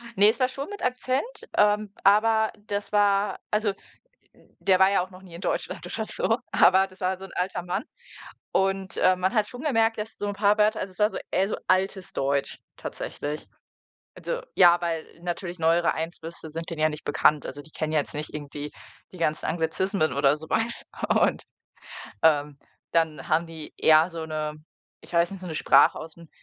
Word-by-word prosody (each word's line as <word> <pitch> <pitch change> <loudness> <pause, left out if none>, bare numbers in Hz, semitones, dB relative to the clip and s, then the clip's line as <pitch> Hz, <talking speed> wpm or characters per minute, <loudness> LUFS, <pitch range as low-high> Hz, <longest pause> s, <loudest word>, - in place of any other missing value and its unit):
Ne, 205 +2 +7
es 230 - -1
war 255 - +3
schon 275 +4 -6
mit 410 -1 -8
Akzent, 255 +1 0 0.3
ähm, 210 0 +3
aber 220 +2 +4 0.2
das 205 0 -3
war 205 -1 +2
also, 210 -1 +1 0.6
der 185 -1 -1
war 190 +1 +6
ja 195 - +3
auch 185 - -10
noch 185 0 -13
nie 175 -3 -12
in 170 - -9
Deutschland, - - -3
oder - - -3
so, - - +1
aber 190 +1 +5
das 185 +1 -18
war 185 +1 0
so 190 - -9
'n - - -12
alter 180 -1 -2
Mann 180 +6 -2 0.7
und, 195 0 0
ähm, 185 0 +4
man 190 +4 +1
hat 215 -2 +2
schon 245 +2 -9
gemerkt, 225 -7 +2
dass 215 +1 -5
so 205 - -3
'n 205 - -2
paar 205 +1 +3
Wörter 215 +1 +3
also, 190 - -4
es 185 - -16
war 210 0 +4
so - - -6
eher 190 - +2
so - - -2
altes 190 0 0
Deutsch 140 +1 -1 0.2
tatsächlich. 150 +1 -5 0.7
Also, - - -3
ja, 175 -1 +7
weil 165 -2 -2 0.2
natürlich 175 0 -4
neuere 165 +1 +3
Einflüsse 165 0 -6
sind 165 +3 -6
denen 160 -2 -5
ja 155 - +4
nicht 150 0 -7
bekannt, 145 0 +3
also, 145 +2 -6
die 155 +1 -18
kennen 155 0 -3
jetzt 145 -1 0
nicht 150 +1 -5
irgendwie 145 0 -6 0.4
die - - -10
ganzen 155 -2 -1
Anglizismen 165 -1 0
oder 140 +1 +3
so 160 - -10
was 225 +1 0 0.2
und, - - +2 0.8
ähm, 150 -3 +3 0.3
dann 160 -2 +1
haben 165 +2 +2
die, 160 -2 -8
ja, 160 +2 +6
so 165 -1 -5
'ne 155 -1 -3 0.5
ich - - -13
weiß 170 0 +3
nicht, 195 - -8
so 185 - -7
'ne 160 - -5
Sprache - - +5
ausm 165 +1 -11
185 Hz, 195 wpm, -26 LUFS, 160-205 Hz, 0.8 s, Ne